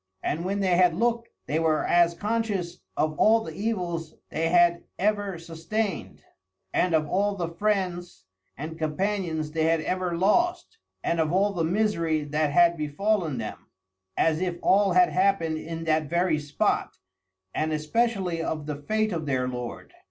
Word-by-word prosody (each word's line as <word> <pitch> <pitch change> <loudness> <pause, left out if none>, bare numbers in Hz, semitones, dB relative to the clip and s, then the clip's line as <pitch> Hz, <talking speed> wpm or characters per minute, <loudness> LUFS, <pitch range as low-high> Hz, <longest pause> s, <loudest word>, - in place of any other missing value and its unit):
And 165 +3 -1
when 200 +2 -1
they 185 -2 +2
had 180 -2 +4
looked 235 +3 0 0.2
they 155 - 0
were 160 -1 +1
as 170 -1 +3
conscious 205 -3 -2 0.2
of 155 0 +1
all 225 +1 +5
the 160 - -7
evils 175 -6 -3 0.2
they 165 +1 0
had 175 0 +4
ever 205 -2 0
sustained, 165 +4 -4 0.5
and 180 -2 +2
of 155 -1 +1
all 200 +5 +1
the 175 -3 -3
friends 175 - -2 0.3
and 160 +4 -6
companions 160 -1 -1
they 160 0 0
had 165 0 +2
ever 180 0 -2
lost, 345 - +1 0.2
and 170 - 0
of 160 -1 +1
all 200 +3 +2
the 170 -3 -1
misery 165 -4 +1
that 150 +1 0
had 170 +2 +4
befallen 160 +1 0
them, 110 -2 -6 0.5
as 160 0 +2
if 180 -2 -1
all 195 -1 +4
had 180 0 +5
happened 185 -4 +1
in 165 +1 -6
that 155 -2 +1
very 170 -2 +1
spot; 145 -1 -1 0.6
and 155 +1 -1
especially 180 +2 0
of 155 -2 -3
the 150 -1 -4
fate 215 +5 0
of 160 -3 -3
their 130 -2 0
lord. 125 -1 -6
170 Hz, 160 wpm, -26 LUFS, 155-200 Hz, 0.6 s, all